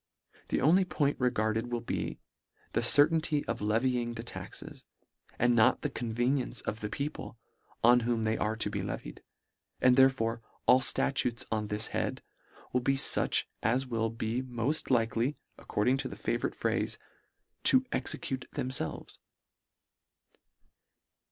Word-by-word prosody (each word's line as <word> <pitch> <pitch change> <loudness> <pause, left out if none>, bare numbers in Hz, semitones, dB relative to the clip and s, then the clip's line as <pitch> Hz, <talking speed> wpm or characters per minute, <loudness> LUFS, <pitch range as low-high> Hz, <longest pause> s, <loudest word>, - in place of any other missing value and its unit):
The - - -1
only 170 +8 +5
point 145 -6 0
regarded 115 -2 0
will 120 - -1
be, 115 - -4 0.6
the - - +1
certainty 155 0 +4
of 115 -1 -3
levying 120 +2 0
the 115 - -6
taxes, 120 - -8 0.5
and 120 0 +3
not 110 -2 +4
the 150 - -1
convenience 120 +2 -1
of 105 - -4
the 105 - -4
people, 140 +1 -5 0.5
on 120 +2 +7
whom 120 -1 -1
they 110 0 +1
are 110 0 -1
to 110 - -2
be - - -2
levied, - - -6 0.6
and 125 -1 +5
therefore 130 -4 +3 0.2
all 130 - +6
ftatutes 130 -2 +1
on 110 -1 -1
this 105 +1 0
head - - -2 0.5
will 125 - +2
be 135 +2 +1
fuch 135 - +3 0.2
as 125 +5 +1
will 115 -2 -1
be 115 +2 -3
moft 130 +4 -2
likely, 120 +2 +1 0.2
according 125 +6 0
to - - -3
the - - -8
favourite - - -2
phrafe, - - -1 0.6
"to 260 0 +6
execute 130 0 -3
themfelves." 125 -11 -4
120 Hz, 140 wpm, -30 LUFS, 115-135 Hz, 0.6 s, on